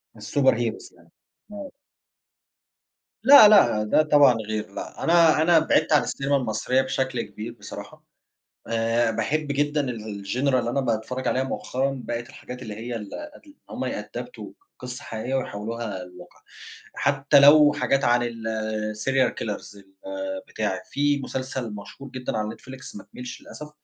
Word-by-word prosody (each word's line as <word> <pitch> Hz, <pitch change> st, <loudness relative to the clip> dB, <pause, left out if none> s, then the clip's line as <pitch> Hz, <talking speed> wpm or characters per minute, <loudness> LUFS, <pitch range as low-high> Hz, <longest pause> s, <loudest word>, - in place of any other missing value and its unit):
الsuperheroes 120 Hz, -5 st, 0 dB
يعني -, -, -23 dB, 0.4 s
آه. 210 Hz, +7 st, -8 dB, 1.5 s
لأ، 265 Hz, -3 st, +10 dB
لأ، 200 Hz, -, +5 dB
ده 105 Hz, +8 st, +3 dB
طبعًا 145 Hz, -4 st, +6 dB
غير. 110 Hz, -1 st, -4 dB
لأ، -, -, -7 dB
أنا 165 Hz, -2 st, +5 dB
أنا 165 Hz, 0 st, +5 dB
بعِدت 155 Hz, 0 st, +2 dB
عن 150 Hz, -, +6 dB
الcinema 140 Hz, +1 st, -3 dB
المصرية 125 Hz, -1 st, +1 dB
بشكل 130 Hz, -1 st, -2 dB
كبير 110 Hz, +2 st, -7 dB
بصراحة. 105 Hz, -3 st, -10 dB, 0.6 s
آآ، 115 Hz, 0 st, +1 dB
باحب 150 Hz, +6 st, -1 dB
جدًا 145 Hz, +1 st, 0 dB
ال 110 Hz, -4 st, -6 dB
الgenre 130 Hz, +7 st, 0 dB
اللي 120 Hz, -2 st, +1 dB
أنا 135 Hz, +3 st, 0 dB
باتفرَّج 125 Hz, +2 st, -2 dB
عليها 130 Hz, -, +1 dB
مؤخرًا، 135 Hz, 0 st, -2 dB
بقت 120 Hz, +2 st, -4 dB
الحاجات 125 Hz, -3 st, -10 dB
اللي 110 Hz, -4 st, -7 dB
هي 115 Hz, +2 st, -5 dB
ال 105 Hz, -3 st, -7 dB
ال 305 Hz, 0 st, -9 dB
إن 295 Hz, -, -16 dB, 0.2 s
هُم -, -, -4 dB
يأدابتوا -, -, -6 dB, 0.3 s
قِصة 125 Hz, +2 st, -7 dB
حقيقية 115 Hz, +4 st, -5 dB
ويحوِّلوها 110 Hz, -4 st, -4 dB
لواقع، 90 Hz, 0 st, -15 dB, 0.5 s
حتى 140 Hz, 0 st, +3 dB
لو 145 Hz, +1 st, +7 dB
حاجات 135 Hz, -1 st, 0 dB
عن 120 Hz, 0 st, +3 dB
الserial 110 Hz, +2 st, -1 dB
killers، 105 Hz, -1 st, -6 dB, 0.7 s
البتاع. 105 Hz, -4 st, -3 dB
في 145 Hz, 0 st, +1 dB
مسلسل 130 Hz, -3 st, -4 dB
مشهور 125 Hz, +6 st, -10 dB
جدًا 125 Hz, -3 st, -4 dB
على 105 Hz, 0 st, -2 dB
Netflix، 130 Hz, 0 st, -10 dB
ما 100 Hz, -, -11 dB
كمَّلش 125 Hz, 0 st, -8 dB
للأسف، 150 Hz, 0 st, -10 dB
125 Hz, 145 wpm, -24 LUFS, 110-145 Hz, 1.5 s, لأ